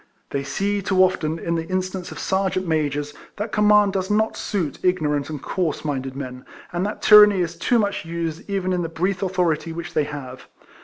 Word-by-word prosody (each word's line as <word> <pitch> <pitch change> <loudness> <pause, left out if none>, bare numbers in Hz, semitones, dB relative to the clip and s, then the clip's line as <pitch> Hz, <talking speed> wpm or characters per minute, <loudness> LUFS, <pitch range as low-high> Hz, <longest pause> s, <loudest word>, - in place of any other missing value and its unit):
They 140 - -1
see 200 +9 -1
too 185 -1 +3
often, 165 -4 0
in 170 +1 -2
the 165 -1 -2
instance 185 -1 -3
of - - -8
serjeant 190 -1 -1
majors, 145 -2 -1 0.2
that 210 +1 -4
conniiaiul 210 -1 +4
does 190 0 -2
not 215 +1 +1
suit 180 -9 -3
ignorant 150 -6 0
and 150 -2 -5
coarse 165 0 -2
minded 135 -3 -3
men; 125 -2 -7 0.3
and 175 +1 -1
that 210 - -6
tyranny 210 -3 +8
is 170 0 -2
too 210 +8 +1
much 205 -3 0
used 165 +1 -5
even 190 -2 -1
in 180 - 0
the 165 - -3
brief 185 +4 -1
authority 180 -4 0
which 165 0 -6
tliey 150 -2 +1
have. 130 -3 -8
175 Hz, 195 wpm, -22 LUFS, 155-195 Hz, 0.3 s, tyranny